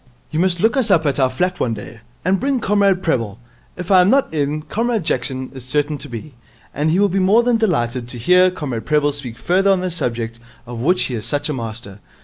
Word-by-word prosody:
You 155 Hz, -, -1 dB
must 180 Hz, -1 st, +2 dB
look 225 Hz, +8 st, +2 dB
us 255 Hz, -5 st, +1 dB
up 165 Hz, -5 st, +3 dB
at 140 Hz, -1 st, 0 dB
our 130 Hz, -1 st, +3 dB
flat 180 Hz, +8 st, -1 dB
one 115 Hz, -3 st, 0 dB
day, 110 Hz, +2 st, -10 dB, 0.3 s
and 190 Hz, +1 st, +2 dB
bring 270 Hz, -1 st, 0 dB
Comrade 200 Hz, -3 st, +2 dB
Prebble. 115 Hz, -, -1 dB, 0.4 s
If 180 Hz, +2 st, -5 dB
I 185 Hz, -1 st, +7 dB
am 180 Hz, -, +3 dB
not 270 Hz, -6 st, +2 dB
in, 150 Hz, 0 st, -1 dB
Comrade 230 Hz, +3 st, -1 dB
Jackson 130 Hz, -4 st, -2 dB
is 130 Hz, -2 st, -9 dB
certain 145 Hz, +3 st, -1 dB
to -, -, -10 dB
be, 120 Hz, +5 st, -8 dB, 0.4 s
and 150 Hz, +3 st, 0 dB
he 165 Hz, -, +2 dB
will 205 Hz, -, +4 dB
be 195 Hz, 0 st, -1 dB
more 200 Hz, +5 st, +4 dB
than 240 Hz, -1 st, +2 dB
delighted 125 Hz, -, 0 dB
to 120 Hz, -, -6 dB
hear 180 Hz, +10 st, +4 dB
Comrade 130 Hz, -, -5 dB
Prebble 150 Hz, -1 st, +2 dB
speak 130 Hz, -5 st, -7 dB
further 185 Hz, +11 st, +2 dB
on 190 Hz, -2 st, +3 dB
the 185 Hz, -1 st, -2 dB
subject 115 Hz, -8 st, -3 dB, 0.3 s
of 120 Hz, -1 st, -7 dB
which 180 Hz, +9 st, +2 dB
he 130 Hz, -, -2 dB
is 110 Hz, -3 st, -4 dB
such 145 Hz, +1 st, -1 dB
a -, -, -1 dB
master.' 115 Hz, -4 st, -6 dB
150 Hz, 235 wpm, -19 LUFS, 125-185 Hz, 0.4 s, I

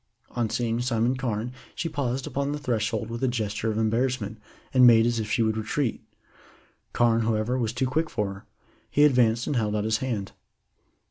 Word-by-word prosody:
On 120 Hz, -2 st, -1 dB
seeing 115 Hz, 0 st, -1 dB
Simon 120 Hz, 0 st, +1 dB
Carne 120 Hz, -2 st, -2 dB, 0.2 s
she 165 Hz, -, -2 dB
paused 135 Hz, -4 st, -2 dB
upon 140 Hz, +1 st, -2 dB
the -, -, -2 dB
threshold 115 Hz, -3 st, -2 dB
with 115 Hz, +2 st, -5 dB
a -, -, +3 dB
gesture 110 Hz, -2 st, -2 dB
of 110 Hz, -, -2 dB
embarrassment, 110 Hz, -1 st, 0 dB, 0.3 s
and 130 Hz, -1 st, +7 dB
made 115 Hz, -1 st, +7 dB
as 120 Hz, -1 st, +1 dB
if 110 Hz, -1 st, -3 dB
she 115 Hz, -, +2 dB
would 110 Hz, 0 st, 0 dB
retreat. 115 Hz, +3 st, -1 dB, 0.9 s
Carne, 115 Hz, -1 st, +3 dB
however, 110 Hz, +2 st, 0 dB
was 115 Hz, -4 st, 0 dB
too 125 Hz, +2 st, -1 dB
quick 155 Hz, +5 st, 0 dB
for 105 Hz, -4 st, -2 dB
her. 100 Hz, -, -13 dB, 0.4 s
He 145 Hz, -, +3 dB
advanced 120 Hz, -5 st, +4 dB
and 145 Hz, -, -1 dB
held 105 Hz, -2 st, 0 dB
out 105 Hz, -, 0 dB
his 110 Hz, 0 st, +1 dB
hand. 110 Hz, -7 st, -3 dB
115 Hz, 190 wpm, -26 LUFS, 110-125 Hz, 0.9 s, and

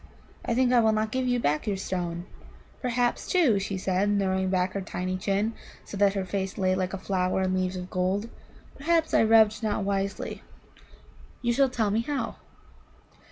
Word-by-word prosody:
I 235 Hz, -, -1 dB
think 255 Hz, 0 st, +3 dB
I 245 Hz, -, +6 dB
will 220 Hz, -1 st, +4 dB
not 215 Hz, 0 st, 0 dB
give 255 Hz, +1 st, -1 dB
you 245 Hz, 0 st, +2 dB
back 150 Hz, -5 st, 0 dB
your 200 Hz, -2 st, 0 dB
stone. 175 Hz, -2 st, -3 dB, 0.6 s
Perhaps, 245 Hz, -1 st, 0 dB
too," 290 Hz, -, +3 dB
she 195 Hz, 0 st, -3 dB
said, 195 Hz, +2 st, +1 dB
throwing 190 Hz, -1 st, 0 dB
back 185 Hz, 0 st, 0 dB
her 200 Hz, -, -2 dB
tiny 185 Hz, -1 st, -3 dB
chin, 200 Hz, +4 st, 0 dB, 0.3 s
so -, -, -8 dB
that 200 Hz, 0 st, +3 dB
her 195 Hz, -1 st, -1 dB
face 190 Hz, 0 st, -3 dB
lay 185 Hz, -1 st, +2 dB
like 185 Hz, 0 st, -1 dB
a -, -, -4 dB
flower 185 Hz, 0 st, 0 dB
in 185 Hz, 0 st, 0 dB
leaves 185 Hz, 0 st, 0 dB
of 180 Hz, 0 st, -6 dB
gold 185 Hz, +4 st, 0 dB, 0.5 s
"perhaps 325 Hz, +3 st, +1 dB
I -, -, +5 dB
rubbed 220 Hz, -1 st, +5 dB
not 215 Hz, -2 st, -1 dB
wisely. 200 Hz, 0 st, -2 dB, 1.0 s
You 240 Hz, 0 st, +2 dB
shall 270 Hz, +2 st, +3 dB
tell 220 Hz, -5 st, 0 dB
me 220 Hz, +2 st, +2 dB
how." 280 Hz, +3 st, -3 dB
200 Hz, 185 wpm, -27 LUFS, 185-230 Hz, 1.0 s, I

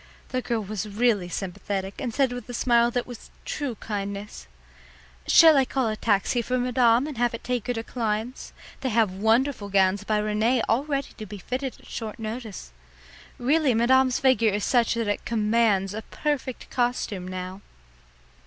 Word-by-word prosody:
The 255 Hz, -, -1 dB
girl 230 Hz, -3 st, -2 dB
was 210 Hz, +1 st, -4 dB
really 205 Hz, -4 st, +1 dB
sympathetic 195 Hz, +2 st, -4 dB
and 250 Hz, -4 st, -2 dB
said 265 Hz, +1 st, +1 dB
with 245 Hz, -1 st, -8 dB
a 245 Hz, -, -4 dB
smile 235 Hz, -1 st, +3 dB
that 245 Hz, 0 st, -2 dB
was 245 Hz, -2 st, -10 dB, 0.2 s
true 290 Hz, -, -3 dB
kindness: 200 Hz, -1 st, -5 dB, 0.8 s
"Shall 320 Hz, -2 st, +8 dB
I 270 Hz, -, +5 dB
call 260 Hz, -2 st, -1 dB
a 215 Hz, -, -2 dB
taxi 215 Hz, +2 st, +1 dB
for 255 Hz, +2 st, -1 dB
madame 245 Hz, 0 st, +3 dB
and 295 Hz, -6 st, -6 dB
have 240 Hz, -1 st, +1 dB
it -, -, -10 dB
take 245 Hz, -3 st, -2 dB
her 245 Hz, -, 0 dB
to 225 Hz, -, -3 dB
Klein's? 225 Hz, +1 st, -3 dB, 0.3 s
They 265 Hz, -, -2 dB
have 220 Hz, -3 st, +2 dB
wonderful 220 Hz, +3 st, +1 dB
gowns 195 Hz, 0 st, +2 dB
by 215 Hz, +1 st, 0 dB
Rene 215 Hz, +3 st, +1 dB
all 245 Hz, +6 st, +1 dB
ready 280 Hz, -2 st, -2 dB
to 215 Hz, -, -5 dB
be 205 Hz, +2 st, -8 dB
fitted 255 Hz, +7 st, -4 dB
at -, -, -19 dB
short 220 Hz, -2 st, -6 dB
notice. 220 Hz, -, -6 dB, 0.7 s
Really, 275 Hz, 0 st, +2 dB
madame's 255 Hz, +2 st, +4 dB
figure 260 Hz, -4 st, +3 dB
is 205 Hz, +1 st, -2 dB
such 240 Hz, -3 st, +2 dB
that 230 Hz, -2 st, -1 dB
it 205 Hz, -, -1 dB
commands 215 Hz, -3 st, +1 dB
a 220 Hz, -, -4 dB
perfect 275 Hz, +1 st, -4 dB
costume 240 Hz, -7 st, -1 dB
now." 185 Hz, +1 st, -6 dB
230 Hz, 175 wpm, -25 LUFS, 210-250 Hz, 0.8 s, Shall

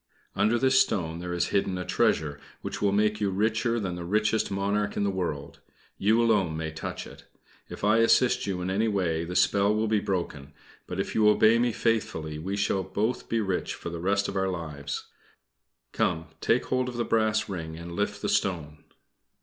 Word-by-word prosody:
Under 105 Hz, +4 st, +3 dB
this 130 Hz, +1 st, +4 dB
stone 80 Hz, -3 st, 0 dB
there 90 Hz, 0 st, -5 dB
is 90 Hz, 0 st, 0 dB
hidden 95 Hz, -2 st, 0 dB
a 90 Hz, -, -4 dB
treasure 75 Hz, -2 st, +1 dB, 0.2 s
which -, -, -5 dB
will 100 Hz, -1 st, +3 dB
make 105 Hz, +1 st, +1 dB
you 100 Hz, -, +2 dB
richer 110 Hz, +4 st, +1 dB
than 95 Hz, -4 st, -3 dB
the 90 Hz, 0 st, -5 dB
richest 105 Hz, +4 st, +1 dB
monarch 100 Hz, +1 st, -1 dB
in -, -, +1 dB
the 100 Hz, -, +1 dB
world. 80 Hz, -7 st, -4 dB, 0.4 s
You 110 Hz, +3 st, +3 dB
alone 100 Hz, -9 st, +2 dB
may 80 Hz, 0 st, -3 dB
touch 80 Hz, -, -5 dB
it. -, -, -13 dB, 0.4 s
If -, -, -9 dB
I 105 Hz, +2 st, +4 dB
assist 115 Hz, +1 st, +3 dB
you 95 Hz, -2 st, -2 dB
in 95 Hz, -, -2 dB
any 105 Hz, +4 st, +1 dB
way 90 Hz, -6 st, 0 dB
the 90 Hz, +1 st, -6 dB
spell 100 Hz, +2 st, +3 dB
will 110 Hz, +1 st, +1 dB
be 110 Hz, -1 st, +2 dB
broken, 75 Hz, -8 st, -3 dB, 0.3 s
but -, -, -5 dB
if -, -, -2 dB
you 105 Hz, -1 st, +5 dB
obey 110 Hz, +2 st, +5 dB
me 120 Hz, 0 st, +2 dB
faithfully, 105 Hz, -10 st, -1 dB
we 95 Hz, +5 st, -3 dB
shall 100 Hz, -1 st, +1 dB
both 100 Hz, +6 st, -2 dB
be 115 Hz, -1 st, +1 dB
rich 95 Hz, -3 st, -2 dB
for 85 Hz, -, -7 dB
the 85 Hz, -, -5 dB
rest 100 Hz, +3 st, +1 dB
of -, -, -5 dB
our 95 Hz, 0 st, +1 dB
lives. 75 Hz, -5 st, -5 dB, 0.9 s
Come, 80 Hz, 0 st, -1 dB
take 120 Hz, +2 st, +2 dB
hold 130 Hz, 0 st, 0 dB
of 120 Hz, -, -7 dB
the 120 Hz, -, 0 dB
brass 110 Hz, -1 st, +1 dB
ring 80 Hz, -5 st, -5 dB
and 85 Hz, +1 st, -8 dB
lift 105 Hz, +3 st, -2 dB
the -, -, +1 dB
stone." 75 Hz, -6 st, -1 dB
100 Hz, 200 wpm, -27 LUFS, 85-110 Hz, 0.9 s, you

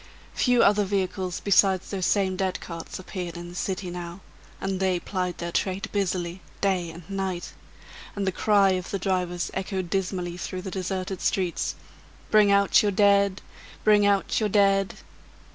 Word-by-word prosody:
Few 245 Hz, -2 st, +3 dB
other 205 Hz, +1 st, +4 dB
vehicles 190 Hz, -2 st, -2 dB
besides 195 Hz, -2 st, +3 dB
those 190 Hz, -3 st, -1 dB
same 190 Hz, -2 st, +2 dB
dead 190 Hz, -1 st, -1 dB
carts 165 Hz, -1 st, -7 dB
appeared 180 Hz, -2 st, -6 dB
in 175 Hz, 0 st, -7 dB
the 175 Hz, -, -11 dB
city 185 Hz, 0 st, -3 dB
now; 175 Hz, +1 st, -7 dB, 0.4 s
and 190 Hz, -1 st, -2 dB
they 185 Hz, -2 st, +1 dB
plied 180 Hz, -1 st, -3 dB
their 170 Hz, 0 st, -4 dB
trade 195 Hz, +4 st, -2 dB
busily, 185 Hz, -3 st, -2 dB, 0.2 s
day 185 Hz, -4 st, 0 dB
and 165 Hz, 0 st, -11 dB
night; 190 Hz, -3 st, -3 dB, 0.6 s
and 200 Hz, -1 st, -2 dB
the 190 Hz, -, +1 dB
cry 200 Hz, 0 st, +3 dB
of 185 Hz, -1 st, -2 dB
the 195 Hz, -, -1 dB
drivers 180 Hz, -2 st, -1 dB
echoed 190 Hz, -2 st, -3 dB
dismally 180 Hz, -2 st, -2 dB
through 185 Hz, +1 st, -5 dB
the 190 Hz, -, -5 dB
deserted 185 Hz, 0 st, -3 dB
streets: 180 Hz, -3 st, 0 dB, 0.6 s
"Bring 210 Hz, -2 st, +6 dB
out 200 Hz, +2 st, +5 dB
your 205 Hz, -2 st, +1 dB
dead! 200 Hz, -1 st, +3 dB, 0.4 s
bring 210 Hz, -1 st, +5 dB
out 200 Hz, -1 st, +2 dB
your 215 Hz, -2 st, 0 dB
dead!" 195 Hz, -1 st, +3 dB
190 Hz, 160 wpm, -26 LUFS, 180-200 Hz, 0.6 s, Bring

